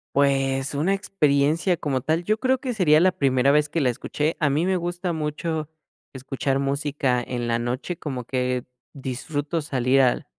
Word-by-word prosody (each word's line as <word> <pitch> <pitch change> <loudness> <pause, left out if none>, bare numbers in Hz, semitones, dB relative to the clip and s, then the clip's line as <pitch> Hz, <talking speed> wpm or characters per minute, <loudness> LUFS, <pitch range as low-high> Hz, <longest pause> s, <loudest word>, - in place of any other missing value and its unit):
Pues, 135 -1 +2
una 165 +7 +1
experiencia 160 -2 +1
como 140 -5 -1
tal, 160 +6 0
yo 215 +4 0
creo 260 +1 +2
que 255 -2 -3
sería 160 -7 +4
la 185 +1 +5
primera 135 -4 +2
vez 150 +1 +3
que 160 +1 -1
la 130 - +3
escuché. 150 +6 -2
A 145 - +2
mí 155 +5 +1
me 190 -1 +1
gusta 175 +1 -3
mucho 155 0 -3 0.5
escuchar 135 +1 -2
música 140 -2 0
en 120 -1 -4
la 115 0 +1
noche, 125 +8 -3
como 130 -6 -5
que 125 0 -1 0.3
disfruto 145 +4 -3
salir 135 -2 +1
al 125 -2 +2
145 Hz, 175 wpm, -24 LUFS, 130-165 Hz, 0.5 s, la